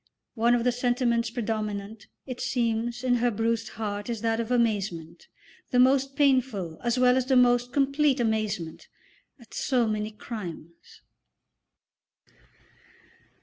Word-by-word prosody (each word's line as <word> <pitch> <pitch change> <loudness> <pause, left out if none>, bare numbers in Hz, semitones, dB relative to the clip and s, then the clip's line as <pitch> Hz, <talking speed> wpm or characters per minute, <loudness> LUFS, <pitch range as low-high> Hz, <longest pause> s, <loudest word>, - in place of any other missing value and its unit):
One 235 +1 +3
of 235 - 0
the 250 - +3
sentiments 240 -1 0
predominant, 215 -2 -4 0.2
it 255 -2 -6
seems, 240 -1 -1
in 250 -1 +2
her 240 +1 +2
bruised 225 +1 -1
heart 205 0 -4
is 230 -3 -3
that 225 0 0
of 230 0 -3
amazement, 200 -9 -1 0.4
the 250 - 0
most 270 +2 +3
painful 255 - +1
as 240 0 0
well 250 0 +4
as 260 -1 0
the 265 - +3
most 245 0 +4
complete 275 0 +2
amazement, 215 -7 -2 0.5
at 235 -2 -17
so 245 -4 +1
many 215 0 -2
crimes. 180 -7 -9
235 Hz, 130 wpm, -27 LUFS, 215-250 Hz, 0.5 s, well